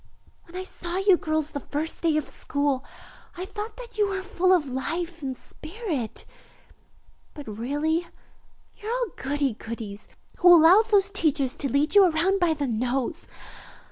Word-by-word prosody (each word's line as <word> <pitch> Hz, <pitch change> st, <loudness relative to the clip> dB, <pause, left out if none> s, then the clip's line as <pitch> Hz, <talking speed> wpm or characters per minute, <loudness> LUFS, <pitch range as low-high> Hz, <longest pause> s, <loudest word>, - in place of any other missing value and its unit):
When 340 Hz, -, -15 dB
I 370 Hz, -, -3 dB
saw 355 Hz, -1 st, -5 dB
you 390 Hz, -1 st, +5 dB
girls 310 Hz, -2 st, -1 dB
the 285 Hz, -, -4 dB
first 300 Hz, +3 st, -4 dB
day 320 Hz, -2 st, +2 dB
of 305 Hz, -, -2 dB
school, 285 Hz, -2 st, -1 dB, 0.5 s
I 365 Hz, -, -4 dB
thought 420 Hz, +2 st, -7 dB
that 475 Hz, -3 st, -10 dB
you 415 Hz, -, +4 dB
were 390 Hz, -1 st, -3 dB
full 370 Hz, -1 st, +1 dB
of 355 Hz, -5 st, +4 dB
life 330 Hz, +6 st, -4 dB
and 265 Hz, -2 st, -4 dB
spirit, 315 Hz, -, -6 dB, 1.1 s
but 290 Hz, -4 st, -9 dB
really 290 Hz, +10 st, -1 dB, 0.7 s
you 430 Hz, -1 st, -7 dB
are 480 Hz, -, 0 dB
all -, -, 0 dB
goody 280 Hz, -1 st, -1 dB
goodies, 215 Hz, -2 st, -7 dB, 0.3 s
who 355 Hz, -1 st, +8 dB
allow 340 Hz, +6 st, +7 dB
those 405 Hz, -3 st, +2 dB
teachers 285 Hz, -7 st, +1 dB
to 275 Hz, -4 st, -3 dB
lead 285 Hz, +4 st, +1 dB
you 405 Hz, -1 st, +8 dB
around 350 Hz, +5 st, +1 dB
by 340 Hz, -3 st, +2 dB
the 290 Hz, -1 st, -2 dB
nose. 250 Hz, +6 st, -2 dB
320 Hz, 165 wpm, -25 LUFS, 280-375 Hz, 1.1 s, who